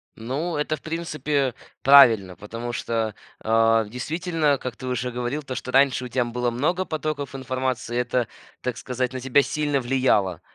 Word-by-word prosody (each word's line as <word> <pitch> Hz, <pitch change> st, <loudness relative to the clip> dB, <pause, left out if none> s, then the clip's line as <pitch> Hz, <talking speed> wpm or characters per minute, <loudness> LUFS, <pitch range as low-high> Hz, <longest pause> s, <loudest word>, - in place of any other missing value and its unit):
Ну, 145 Hz, +9 st, -3 dB
это, 150 Hz, +1 st, 0 dB
в -, -, -16 dB
принципе, 150 Hz, -5 st, -1 dB, 0.3 s
правильно. 115 Hz, -9 st, +7 dB
Потому 115 Hz, +5 st, -6 dB
что, 115 Hz, -2 st, -1 dB, 0.3 s
э, 115 Hz, 0 st, +3 dB
действительно, 155 Hz, -, 0 dB
как 125 Hz, -2 st, -6 dB
ты 130 Hz, -, -8 dB
уже 125 Hz, 0 st, -2 dB
говорил, 125 Hz, +5 st, -3 dB
то 130 Hz, -2 st, -5 dB
что 130 Hz, -, -5 dB
раньше 135 Hz, -1 st, +3 dB
у -, -, -4 dB
тебя 125 Hz, 0 st, 0 dB
было 120 Hz, +1 st, -1 dB
много 165 Hz, +10 st, 0 dB
потоков 150 Hz, -4 st, -3 dB
информации, 130 Hz, -2 st, -2 dB
это, 125 Hz, -1 st, 0 dB, 0.3 s
так 125 Hz, -2 st, -3 dB
сказать, 125 Hz, 0 st, -3 dB
на 130 Hz, -, -4 dB
тебя 135 Hz, +2 st, +3 dB
сильно 145 Hz, -1 st, 0 dB
влияло. 120 Hz, -8 st, +1 dB
130 Hz, 165 wpm, -24 LUFS, 120-145 Hz, 0.3 s, правильно